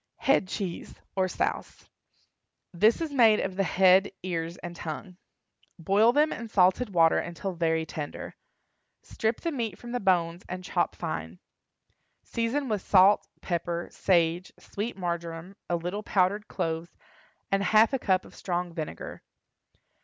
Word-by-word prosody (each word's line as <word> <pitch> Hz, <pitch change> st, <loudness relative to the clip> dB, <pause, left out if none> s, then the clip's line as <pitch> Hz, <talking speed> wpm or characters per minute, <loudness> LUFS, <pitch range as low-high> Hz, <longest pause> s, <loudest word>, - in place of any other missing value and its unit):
HEAD 270 Hz, -8 st, +2 dB
CHEESE. 185 Hz, -2 st, -5 dB, 0.2 s
(OR 190 Hz, -1 st, +2 dB
SOUSE.) -, -, -3 dB, 0.9 s
This 215 Hz, -, +3 dB
is 320 Hz, -2 st, -2 dB
made 225 Hz, -5 st, +5 dB
of 190 Hz, -1 st, -2 dB
the 195 Hz, -, +1 dB
head, 190 Hz, +1 st, +4 dB
ears 170 Hz, -2 st, -3 dB
and 175 Hz, -1 st, -8 dB
tongue. 170 Hz, +3 st, -7 dB, 0.6 s
Boil 200 Hz, +7 st, +4 dB
them 300 Hz, +4 st, +3 dB
in 230 Hz, -, -6 dB
salted 195 Hz, +3 st, +3 dB
water 165 Hz, -3 st, +4 dB
until 175 Hz, +3 st, -4 dB
very 160 Hz, -1 st, 0 dB
tender. 150 Hz, -2 st, -6 dB, 0.7 s
Strip 220 Hz, +1 st, -2 dB
the 335 Hz, -, -1 dB
meat 230 Hz, -, -3 dB
from 240 Hz, -, -9 dB
the 245 Hz, -, -1 dB
bones 175 Hz, -3 st, +1 dB
and 185 Hz, 0 st, -5 dB
chop -, -, -1 dB
fine. 80 Hz, +2 st, -5 dB, 0.9 s
Season 235 Hz, +5 st, -1 dB
with 210 Hz, -4 st, -1 dB
salt, 195 Hz, +1 st, +5 dB
pepper, 170 Hz, -1 st, -3 dB
sage, 175 Hz, -1 st, +1 dB
sweet 210 Hz, +2 st, -5 dB
marjoram, 170 Hz, 0 st, -4 dB
a 175 Hz, -, +2 dB
little 175 Hz, +5 st, -3 dB
powdered 200 Hz, +1 st, +1 dB
cloves, 165 Hz, +1 st, -4 dB, 0.5 s
and 195 Hz, 0 st, +2 dB
half 215 Hz, +5 st, +4 dB
a 270 Hz, -, +1 dB
cup 190 Hz, -5 st, +1 dB
of -, -, -15 dB
strong 175 Hz, -1 st, -3 dB
vinegar. 155 Hz, -, -6 dB
185 Hz, 145 wpm, -28 LUFS, 170-215 Hz, 0.9 s, made